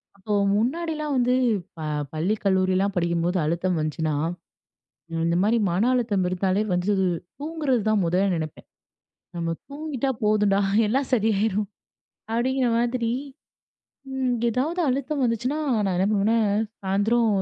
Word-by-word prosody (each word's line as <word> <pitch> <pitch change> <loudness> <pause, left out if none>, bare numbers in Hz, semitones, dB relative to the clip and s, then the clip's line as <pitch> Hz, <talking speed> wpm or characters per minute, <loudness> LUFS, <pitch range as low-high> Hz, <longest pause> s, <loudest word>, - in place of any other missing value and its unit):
அப்போ 205 +2 -4 0.2
முன்னாடிலாம் 305 +5 -1
வந்து 250 0 +3 0.4
ப - - -11 0.3
பள்ளி 175 +8 0
கல்லூரிலாம் 190 +1 +2
படிக்கும்போது 170 +1 0
அழுத்தம் 170 +2 0
வந்துச்சுனா, 155 0 -1 1.1
இந்த 170 0 +1
மாரி 225 +3 +3
மன 180 +5 +1
அழுத்தம் 220 -7 +1
இருந்தாலே 190 +3 +1
வந்து 180 +3 +1 0.5
தூங்குறது 295 -6 0
தான் 215 -2 +3
மொத 170 +2 0 0.2
நெனைப்பேன். 155 -2 -5 0.7
"நம்ம 165 -1 -1 0.2
தூங்கிட்டா 280 -2 -3
போதும்டா. 210 -2 +3 0.3
எல்லாம் 265 +5 0
சரியாயிரும்." 210 -2 +1 0.7
அப்படீங்கிற 255 +2 +1
மாதிரி. 235 -1 0 1.0
ம் 260 -2 0
எதாவது 280 +10 0
அழுத்தம் 275 +2 -1
வந்துச்சுனா 245 +4 0 0.3
நான் 190 - 0
என்ன 190 - +2
பண்ணுவன்னா, 215 +2 +2 0.5
சாயந்தரம் 210 +5 +2
215 Hz, 115 wpm, -24 LUFS, 185-255 Hz, 1.1 s, வந்து